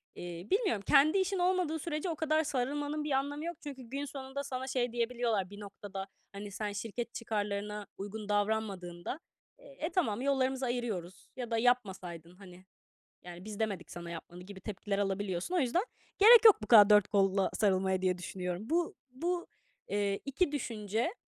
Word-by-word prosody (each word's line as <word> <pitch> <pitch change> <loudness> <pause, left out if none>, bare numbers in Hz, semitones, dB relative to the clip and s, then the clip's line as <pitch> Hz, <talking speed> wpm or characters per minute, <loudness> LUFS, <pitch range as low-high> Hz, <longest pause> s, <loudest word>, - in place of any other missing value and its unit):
eee, 175 +1 -7
bilmiyorum 390 - +2
kendi 300 +6 +6
işin 380 0 +1
olmadığı 355 -3 +1
sürece 305 +2 -3
o 330 - -1
kadar 315 +1 +2
sarılmanın 290 +2 -1
bir 295 - -3
anlamı 285 +3 -1
yok. 340 -1 -4
Çünkü 275 -3 -7
gün 275 +4 -4
sonunda 275 0 -6
sana 260 -1 -4
şey 250 -2 0
diyebiliyorlar 235 -5 0
bir 205 - -10
noktada, 200 -1 -7 0.3
hani, 200 +1 -7
sen 210 +1 -3
şirket 230 +3 -4
çıkarlarına 210 -2 -3
uygun 205 +1 -6
davranmadığında, 205 - -1 0.4
"E, - - -6
tamam, 245 - 0
yollarımızı 265 -1 +1
ayırıyoruz." 220 -8 -4
ya 245 -2 -5
da 230 - +2
"Yapmasaydın, 190 -8 0
hani, 185 -1 -14 0.6
yani 175 0 -10
biz 210 -1 -7
demedik 200 -6 -2
sana 170 0 -7
yapmanı." 175 +1 -8
gibi 190 0 -10
tepkiler 200 0 -3
alabiliyorsun. 195 - -1
O - - +3
yüzden 275 - +1 0.3
gerek 455 +3 +9
yok 425 - +8
bu - - -4
kadar 210 -2 +8
dört 210 -1 +6
kolla 195 -1 +2
sarılmaya 190 -2 +2
diye 185 -1 +1
düşünüyorum. 180 +4 -5
Bu, 340 +1 +1 0.2
bu, 345 +7 -2 0.4
eee, 200 -1 0
2 285 +4 0
düşünce, 230 - -2
220 Hz, 165 wpm, -32 LUFS, 195-285 Hz, 0.6 s, gerek